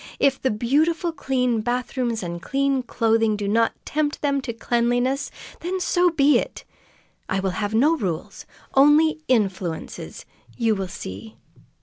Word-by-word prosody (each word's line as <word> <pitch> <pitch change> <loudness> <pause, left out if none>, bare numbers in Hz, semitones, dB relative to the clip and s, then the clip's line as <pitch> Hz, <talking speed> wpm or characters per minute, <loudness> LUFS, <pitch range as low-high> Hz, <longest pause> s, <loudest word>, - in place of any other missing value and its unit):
"If 275 -1 +2
the 260 - +1
beautiful 305 - +1
clean 250 -6 0
bathrooms 240 -1 -2
and 170 -1 -5
clean 275 +2 0
clothing 225 -3 +1
do 205 -1 -3
not 225 +3 +2
tempt 300 0 -1
them 280 -1 +1
to 250 - -4
cleanliness, 245 +4 0 0.3
then 370 +3 -3
so 360 -1 +3
be 295 -3 +4
it! - - -6 0.7
I 190 - 0
will 190 -1 -1
have 205 +3 -2
no 295 +8 +4
rules; 180 - -4 0.3
only 300 +3 +5
influences. 195 -8 -2 0.3
You 230 -2 +2
will 195 -2 -3
see!" 110 - -8
245 Hz, 140 wpm, -23 LUFS, 210-280 Hz, 0.7 s, only